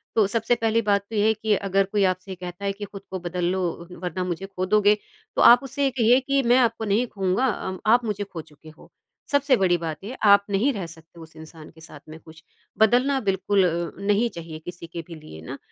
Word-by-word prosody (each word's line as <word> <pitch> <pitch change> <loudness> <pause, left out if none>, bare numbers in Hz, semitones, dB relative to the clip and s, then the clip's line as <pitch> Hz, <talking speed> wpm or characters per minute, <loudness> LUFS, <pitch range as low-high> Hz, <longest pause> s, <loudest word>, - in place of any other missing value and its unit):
तो 220 - +4
सबसे 230 +3 0
पहली 230 0 +1
बात 205 -2 +1
तो 225 - -6
ये 205 - +2
है 220 - +4
कि 215 -1 0
अगर 195 0 +1
कोई 200 +1 0
आपसे 185 +1 -2
कहता 180 +2 -8
है 200 - +1
कि 205 +1 -7
ख़ुद 200 -1 -10
को 190 - -4
बदल 175 0 -3
लो 190 0 -1 0.4
वरना 180 0 -3
मुझे 180 +1 -4
ख़ो 185 -1 -4
दोगे, 210 +1 +3 0.4
तो - - +1
आप 245 +2 +8
उससे 275 +1 -1
कहिए 245 0 +4
कि 275 +1 0
मैं 240 +1 +4
आपको 230 -3 +1
नहीं 215 +4 +1
ख़ोऊँगा 195 +3 -1
अ, 190 -5 -3
आप 235 +2 +4
मुझे 205 -1 -2
ख़ो 190 -5 -8
चुके 155 +1 -17
हो। 155 - -18 0.4
सबसे 285 -2 +3
बड़ी 180 -3 +2
बात 160 +1 -6
ये 245 +6 -6
आप 200 0 +6
नहीं 210 +8 +2
रह 195 -6 -4
सकते 165 +1 -16
उस 160 0 -14
इंसान 160 0 -12
के 160 0 -19
साथ 155 -2 -12
में 160 - -10
ख़ुश। 160 0 -16 0.4
बदलना 250 +5 +3
बिल्कुल 195 +1 +1
अ, 170 0 -2
नहीं 210 +4 +2
चाहिए 165 -5 -9
किसी 175 -1 -8
के 170 +1 -7
भी 170 - -9
लिए 155 - -12
ना 80 - -8
195 Hz, 235 wpm, -24 LUFS, 175-225 Hz, 0.4 s, आप